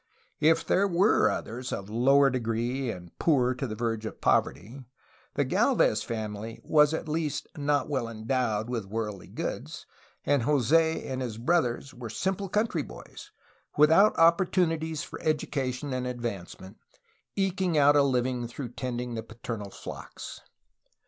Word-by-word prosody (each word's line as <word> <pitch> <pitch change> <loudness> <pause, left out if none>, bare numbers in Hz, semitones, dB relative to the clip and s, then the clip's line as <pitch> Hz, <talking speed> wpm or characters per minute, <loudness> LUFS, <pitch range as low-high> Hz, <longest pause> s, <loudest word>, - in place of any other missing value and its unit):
If 160 +2 +3
there 200 +2 +3
were 180 - +4
others 120 +5 -4
of 100 - -4
lower 135 +5 +4
degree 120 +2 -1
and 90 -5 -8
poor 130 -6 +3
to 130 +1 -4
the 110 - -5
verge 115 -1 -2
of - - -9
poverty, 125 +8 0 0.5
the - - +1
Gd - - +2
lvez - - +3
family 110 0 -5
was 150 -1 +4
at 160 - -3
least 155 -1 -2
not 145 -1 0
well 130 -5 -1
endowed 110 -1 -1
with 120 -4 -3
worldly 105 -2 -4
goods, - - -5 0.4
and 145 -2 +3
Jos6 150 +5 +2
and 130 -1 -3
his 120 -4 -4
brothers 135 -1 0
were 120 -2 -7
simple 190 - -2
country 210 -5 0
boys, - - -11 0.5
without 160 +8 +6
opportunities 165 -2 +2
for - - -9
education 140 -3 -1
and 125 0 -2
advancement, 110 -6 -6 0.6
eking 190 -3 0
out 145 0 +6
a 145 - +6
living 125 -2 0
through 120 +1 -6
tending 125 0 -4
the 115 - -3
paternal 110 -2 -7
flocks. - - -9
130 Hz, 145 wpm, -28 LUFS, 115-155 Hz, 0.6 s, without